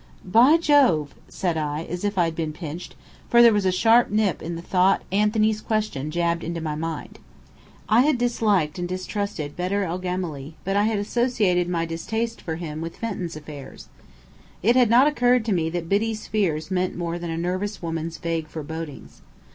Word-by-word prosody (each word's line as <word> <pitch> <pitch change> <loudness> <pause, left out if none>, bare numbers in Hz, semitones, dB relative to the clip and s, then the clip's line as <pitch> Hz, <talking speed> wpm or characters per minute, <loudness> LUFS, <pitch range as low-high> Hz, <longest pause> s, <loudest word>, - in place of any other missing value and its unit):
"By 240 - +6
Jove!" 270 - +3 0.2
said 175 -3 -2
I, 150 0 -2
as 175 +2 -6
if 205 -1 -1
I 175 - +4
had 165 -1 -3
been 160 -2 -3
pinched 165 +2 -7 0.3
for 235 0 +7
there 235 -2 +7
was 205 -2 +1
a - - +3
sharp 225 +6 +4
nip 210 -5 +1
in 170 +2 -4
the 165 - -7
thought 185 +2 +2
Anthony's 215 +1 +2
question 215 -12 -2
jabbed 170 +1 0
into 170 +1 -3
my 155 -2 -3
mind. 160 +1 -5 0.7
I 225 +3 +5
had 290 0 +3
disliked 210 -9 +1
and 175 - -2
distrusted 185 -4 -4
Bedr 190 +3 -1
el 180 0 -3
Gemály, 175 -6 -4
but 195 +1 -1
I 205 +1 +3
had 220 -1 +1
associated 205 -5 +1
my 170 -2 0
distaste 220 +8 -3
for 160 - -4
him 160 -2 -6
with 165 0 -6
Fenton's 190 -7 -4
affairs. 150 -2 -10 0.7
It 235 +5 +4
had 250 -3 +5
not 245 +4 +6
occurred 250 -5 +3
to 225 - -1
me 165 -3 0
that 170 0 -4
Biddy's 215 +3 0
fears 170 -6 -1
meant 185 0 -1
more 170 0 -3
than 170 -1 -5
a 165 - -3
nervous 185 +4 -3
woman's 165 0 -3
vague 165 -2 -3
forebodings. 160 -1 -8
180 Hz, 185 wpm, -24 LUFS, 165-215 Hz, 0.7 s, for